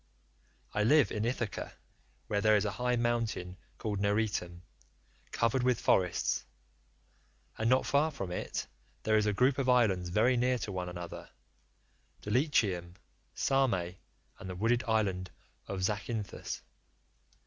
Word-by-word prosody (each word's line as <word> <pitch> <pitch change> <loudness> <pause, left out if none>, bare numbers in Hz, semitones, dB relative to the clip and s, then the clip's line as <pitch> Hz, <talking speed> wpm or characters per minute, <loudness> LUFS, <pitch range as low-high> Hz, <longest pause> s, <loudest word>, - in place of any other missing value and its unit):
I 105 - +1
live 125 0 +5
in 105 +1 -1
Ithaca, 115 -4 -3 0.5
where 100 -1 0
there 110 +1 +5
is 105 0 +2
a 100 - 0
high 125 +2 0
mountain 115 -6 -1 0.2
called 105 -3 -3
Neritum, 100 -4 -1 0.7
covered 115 +3 +1
with 125 -2 +2
forests; 90 -2 +2 1.1
and 110 +1 0
not 130 +1 +4
far 145 +3 +3
from 95 - -5
it 90 - -3 0.4
there 110 - +2
is 105 0 +3
a - - +3
group 125 +7 +2
of 130 -2 +1
islands 100 -8 +3
very 115 +7 +3
near 125 +1 +2
to 105 - -4
one 90 -1 -3
another—Dulichium, 90 - -3 0.4
Same, 135 -5 +2 0.6
and 95 - -8
the 90 - -5
wooded 115 +5 +1
island 95 -5 0 0.4
of 95 -2 -4
Zacynthus. 105 +1 -3
110 Hz, 130 wpm, -31 LUFS, 95-125 Hz, 1.1 s, live